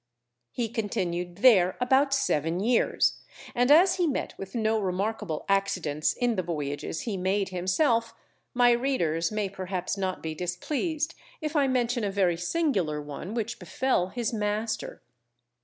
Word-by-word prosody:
He 240 -2 -2
continued 185 -6 -2
there 190 -8 +6
about 265 +3 +3
seven 175 - +1
years, 230 +4 +2 0.3
and 245 +2 +2
as 360 +6 +6
he 355 -2 +2
met 280 - -2
with 195 +2 -8
no 220 -1 +1
remarkable 195 -2 -2
accidents 185 -7 +1
in 245 -2 0
the 185 - 0
voyages 150 -3 -4
he 215 -5 -3
made 190 +2 0
himself, 230 - +1 0.4
my 245 0 +5
readers 220 - +1
may 215 -1 -1
perhaps 185 0 -4
not 190 -1 -3
be 160 -1 -3
displeased 295 - -2 0.3
if 310 -1 -4
I 285 -2 +4
mention 245 -2 0
a 205 - 0
very 190 -3 +2
singular 180 - 0
one 150 +8 -7
which 230 0 -3
befell 180 +1 0
his 235 +3 -3
master. 215 +1 -2
205 Hz, 145 wpm, -27 LUFS, 180-245 Hz, 0.4 s, there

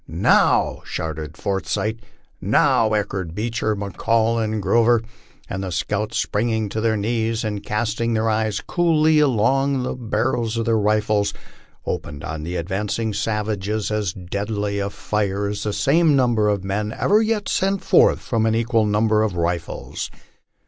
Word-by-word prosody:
"Now," - - +2
shouted 80 -1 -5
Forsyth. 100 +3 -2 0.4
"Now," 110 -1 +3
echoed 95 -5 -2
Beecher, 110 0 -1
McCall, 110 +4 0
and 110 0 -2
Grover; 115 +2 +3 0.4
and 95 - -4
the 95 - -4
scouts, 105 +6 -2
springing 110 0 0
to 110 +2 -3
their 110 -1 +1
knees, 115 +2 -1
and 105 -2 -3
casting 115 +2 -1
their 110 +1 +1
eyes 110 -1 0
coolly 160 -3 +3
along 135 0 +2
the - - -2
barrels 120 -1 -1
of 115 - -1
their 115 - +2
rifles, 105 0 +1 0.5
opened 75 -1 -4
on 80 -1 -5
the 85 +3 -5
advancing 105 +5 -2
savages 105 0 -2
as 105 -4 0
deadly 100 +3 -3
a 100 0 -1
fire 100 -1 -2
as 105 - -4
the 105 - -1
same 150 +6 +3
number 120 -5 +2
of 100 -2 -1
men 105 +2 -2
ever 210 +2 +3
yet 220 -2 0
sent 195 0 0
forth - - +4
from 115 -2 0
an 110 - +2
equal 115 -1 +1
number 105 +1 +2
of 110 -4 0
rifles. 85 0 -3
110 Hz, 150 wpm, -22 LUFS, 100-115 Hz, 0.5 s, forth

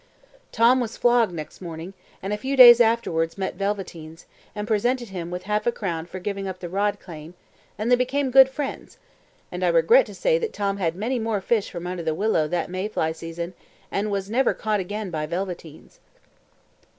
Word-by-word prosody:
Tom 240 +3 +4
was 230 -2 -4
flogged 240 -4 +3
next 160 0 -8
morning, 170 +1 -7 0.3
and 195 +2 -2
a - - -1
few 270 +5 -3
days 240 -2 +10
afterwards 200 -8 +1
met 190 -1 -2
Velveteens, 175 -5 -5 0.3
and 210 0 -4
presented 240 +2 0
him 175 -3 -6
with 180 +1 -5
half 210 +3 -1
a - - +4
crown 170 -7 -4
for 185 - -8
giving 195 +1 -4
up 185 -1 -5
the 175 -1 -7
rod 205 +2 0
claim, 160 0 -11 0.4
and 220 +4 -1
they - - +8
became 260 +2 -1
sworn 265 0 +8
friends; 270 +1 -6 0.5
and - - -4
I - - +3
regret - - +5
to - - -10
say - - +2
that 455 -2 -3
Tom 200 -1 -1
had 170 -4 -1
many 235 +6 -2
more 220 -2 -1
fish 210 +2 0
from 175 -2 -7
under 180 -1 -4
the 160 -1 -1
willow 195 -5 +1
that 170 +1 -2
May 185 +2 -2
fly 160 -7 -1
season, 165 +2 -6 0.4
and 205 +2 -1
was 195 -1 -2
never 245 +5 +1
caught 215 -2 -1
again 200 +1 -4
by 155 -2 -3
Velveteens. 175 -2 -6
200 Hz, 200 wpm, -24 LUFS, 175-235 Hz, 0.5 s, days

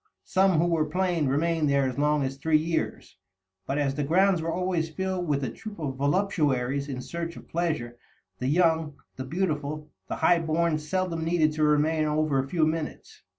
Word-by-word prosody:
Some, 190 0 +3
who 165 - +3
were 165 -3 +1
plain, 175 -2 0
remained 155 +2 +1
there 140 -1 +2
as 130 +1 -4
long 150 0 +2
as 135 0 -2
three 155 +2 +3
years; 160 +1 -3 0.5
but, 135 - -1
as 140 -2 +1
the 145 +1 -2
grounds 180 +4 +3
were 165 +1 -2
always 180 -2 -1
filled 185 +2 -3
with 140 -2 0
a 125 - -2
troop 215 - -9
of 145 -5 -3
voluptuaries 140 -4 0
in 130 -2 -4
search 170 +3 -5
of - - -12
pleasure, 155 -9 -2 0.4
the 125 - -2
young, 160 -1 +2 0.2
the 130 - -4
beautiful, 150 -2 -2 0.2
the - - -3
high 175 -1 +4
born 165 0 +1
seldom 165 +1 -2
needed 160 -2 +2
to 155 0 -1
remain 155 +1 +3
over 150 -2 +1
a 135 0 -2
few 165 -1 +2
minutes. 155 -1 -4
155 Hz, 190 wpm, -27 LUFS, 145-170 Hz, 0.5 s, high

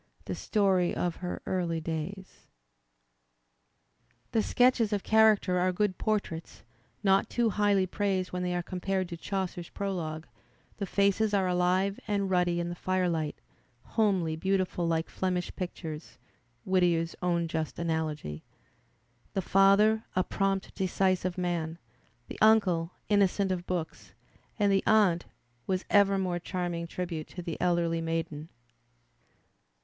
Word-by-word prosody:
The - - -3
story 190 -4 +1
of 175 -1 -1
her 180 -1 -5
early 175 -3 -1
days. 165 +4 -6 1.8
The 225 - +2
sketches 245 -2 +3
of 205 -2 -1
character 215 -4 +4
are 185 +1 +2
good 190 0 -1
portraits, 200 -7 -2 0.4
not 195 -1 +3
too 235 -2 +1
highly 205 -2 +2
praised 190 -1 -1
when 180 - -2
they 180 0 -1
are 175 - -1
compared 185 +1 -2
to 170 - -5
Chaucer's 185 -2 -4
Pro 200 -1 -3
logue; 160 -3 -4 0.5
the 200 - -3
faces 200 +2 +2
are 195 -1 +2
aUve 180 +2 +1
and 200 -2 0
ruddy 175 -1 +2
in 170 0 -2
the - - -3
firelight, 175 -4 -1 0.5
homely 190 -8 +1
beautiful 185 0 0
like 165 0 0
"Flemish 180 -1 -2
pictures" 160 -4 -6 0.5
(Whittier's 175 -3 +2
own 170 -2 +1
just 160 -1 -3
ft^ogy) 155 - -3 0.5
— - - -39
tiie 195 - 0
father^ 200 +4 +4
a 185 - +3
"prompt, 195 0 -1
decisive 185 -1 0
man,'' 170 -3 -2 0.5
the - - -8
uncle 190 -7 +4 0.2
"innocent 200 -1 +2
of 180 -1 -3
books," 175 -3 -4 0.4
and 205 -2 +3
the 195 0 +3
aunt 200 -6 +4 0.2
— 120 0 -41
was 185 0 -1
ever 200 -1 +5
more 180 -2 -1
charm 175 0 -3
ing 170 0 -4
tribute 170 -3 -4
to 180 - -8
the 170 -2 -5
elderly 170 -2 +1
maiden? 165 -1 -3
180 Hz, 140 wpm, -29 LUFS, 170-195 Hz, 1.8 s, ever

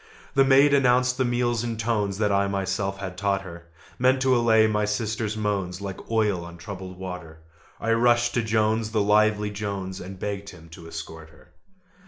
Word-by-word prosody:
The 135 - +5
maid 135 +2 +5
announced 125 -1 +3
the 130 - +3
meal 120 0 +1
in 115 -2 -3
tones 105 -4 -1
That 105 -1 +1
I 100 0 +2
myself 95 0 -2
had 95 -2 -6
taught 100 -1 0
her, 85 -2 -11 0.3
Meant 130 +1 +3
to 130 -1 +4
allay 115 -2 +4
my 105 -1 +1
sister's 110 0 -2
moans 100 -4 -2
Like 100 -2 -7
oil 105 -6 +1
on 85 0 -10
troubled 95 0 -8
water: 90 -4 -7 0.4
I 115 - -1
rushed 120 +1 +3
to 120 - +1
Jones, 110 0 +1
the 110 - +2
lively 105 0 +3
Jones, 100 -2 -5
And 95 +1 -8
begged 100 +1 -4
him 80 0 -14
to 85 0 -12
escort 80 -1 -8
her. 80 - -21
105 Hz, 185 wpm, -25 LUFS, 95-115 Hz, 0.4 s, The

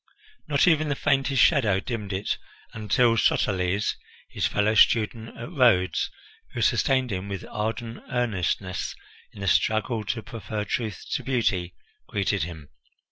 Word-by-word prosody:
Not 145 +3 +3
even 155 -3 +3
the 145 - 0
faintest 135 -1 +2
shadow 110 - +3
dimmed 105 -2 -5
it 95 +2 -2 0.3
until 115 +2 +2
Soteles, 95 -1 +1 0.4
his - - 0
fellow 105 +1 +1
student 110 +1 +2
at 120 +7 -7
Rhodes, 105 - +3 0.5
who - - -2
sustained 130 -2 +2
him 95 +1 -4
with 100 -1 -5
ardent 115 +2 -3
earnestness 100 - -1 0.4
in 100 - -12
the 100 - -2
struggle 110 +3 +1
to 110 +3 -3
prefer 110 -3 -5
truth 110 -3 -3
to - - -1
beauty, 100 -9 0 0.3
greeted - - 0
him. 80 -2 -6
110 Hz, 135 wpm, -25 LUFS, 95-125 Hz, 0.5 s, Not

